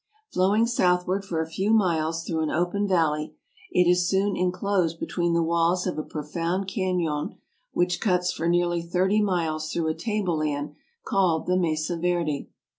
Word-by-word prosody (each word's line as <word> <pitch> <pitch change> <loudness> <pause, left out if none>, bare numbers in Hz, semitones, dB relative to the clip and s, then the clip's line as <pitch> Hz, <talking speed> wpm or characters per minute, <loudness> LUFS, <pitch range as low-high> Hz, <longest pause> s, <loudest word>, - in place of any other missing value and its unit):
Flowing 200 +5 +3
southward 185 -4 +1
for 170 -4 -2
a 160 - -3
few 190 +6 -1
miles 165 -6 +2
through 165 -2 -2
an 155 -1 0
open 180 +5 0
valley, 155 -5 +1 0.3
it 180 - +3
is 180 0 +3
soon 195 +1 +1
inclosed 180 -2 0
between 175 -1 -1
the 170 0 +2
walls 170 +2 +1
of 180 - -1
a - - 0
profound 165 +5 -3
canon 180 -7 -1 0.4
which 175 0 0
cuts 180 -3 +2
for 165 -2 -3
nearly 175 0 +2
thirty 185 +5 +1
miles 165 -6 -1
through 165 -2 0
a - - +1
table 205 -4 -1
land 145 -1 -2 0.3
called 175 -5 +1
the 180 - +1
Mesa 165 -1 0
Verde. 170 -4 -1
175 Hz, 165 wpm, -25 LUFS, 160-185 Hz, 0.4 s, Flowing